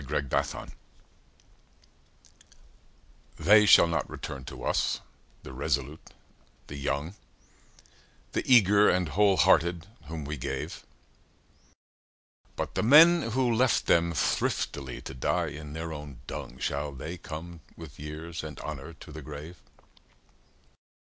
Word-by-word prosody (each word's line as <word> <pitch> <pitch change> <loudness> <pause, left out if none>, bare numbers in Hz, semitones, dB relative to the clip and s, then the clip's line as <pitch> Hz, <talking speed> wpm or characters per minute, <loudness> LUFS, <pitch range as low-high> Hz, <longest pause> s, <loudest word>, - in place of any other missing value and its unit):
8 - - -10
Autoplay - - -6 0.2
1917 - - -2 2.6
They 105 +1 +6
shall - - +8
not 85 -3 -2
return 65 - -7
to - - -9
us, - - 0 0.4
the 65 - -9
resolute, 70 +2 -3 0.5
the 70 - -9
young, 70 +4 -3 1.2
The - - -1
eager 105 -3 +6
and 90 -3 +1
whole 100 +3 +3
hearted 85 +2 +3 0.2
whom 80 -2 -6
we 75 +1 -4
gave: - - -5 1.7
But - - -4
the - - 0
men 155 +3 +7
who 125 -2 +2
left 125 +1 +2
them 85 0 +3
thriftily 70 -2 -1
to - - -7
die 65 - -1
in 75 0 -9
their 80 0 -5
own 75 -4 -9
dung, 60 - -7
Shall 70 +2 -3
they 80 +7 -7
come 85 +2 -8 0.2
with 80 -5 -11
years 80 +3 -7
and 80 -1 -8
honour 75 +2 -7
to 80 - -13
the 80 +1 -8
grave? 75 +4 -9
80 Hz, 125 wpm, -28 LUFS, 70-90 Hz, 2.6 s, shall